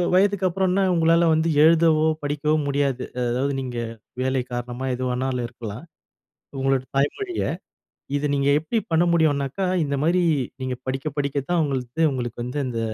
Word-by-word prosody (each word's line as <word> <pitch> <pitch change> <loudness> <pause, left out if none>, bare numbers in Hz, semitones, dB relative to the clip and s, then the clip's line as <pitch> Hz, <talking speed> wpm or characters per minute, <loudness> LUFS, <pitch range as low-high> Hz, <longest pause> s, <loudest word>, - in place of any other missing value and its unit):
வயதுக்கு 195 0 +3
அப்புறன்னா 190 +1 +1
உங்களால 165 +1 +4
வந்து 160 +1 +1 0.2
எழுதவோ! 160 -1 +4 0.2
படிக்கவோ! 150 +1 0
முடியாது. 140 -2 0 0.3
அதாவது 130 +4 0
நீங்க 125 -2 -5 0.4
வேலை 130 0 0
காரணமா 120 +2 -4
எது 130 - -4
வேணாலும் 125 -1 -1
இருக்கலாம். 120 +3 -8 0.8
உங்களோட 135 -1 +2
தாய்மொழிய, 350 - 0 0.8
இத 145 +1 -1
நீங்க 140 0 +1
எப்டி 160 +9 -2
பண்ண 165 +1 +4
முடியும்னாக்கா, 150 +1 +1 0.2
இந்தமாரி 155 +5 +1 0.4
நீங்க 130 -1 -3
படிக்க 135 +3 -2
படிக்க 140 -1 -1
தான் 175 -2 +3
உங்களது 135 +2 -2
உங்களுக்கு 120 -2 -4
வந்து 125 +4 -3
அந்த 120 -2 -3
140 Hz, 140 wpm, -23 LUFS, 130-165 Hz, 0.8 s, உங்களால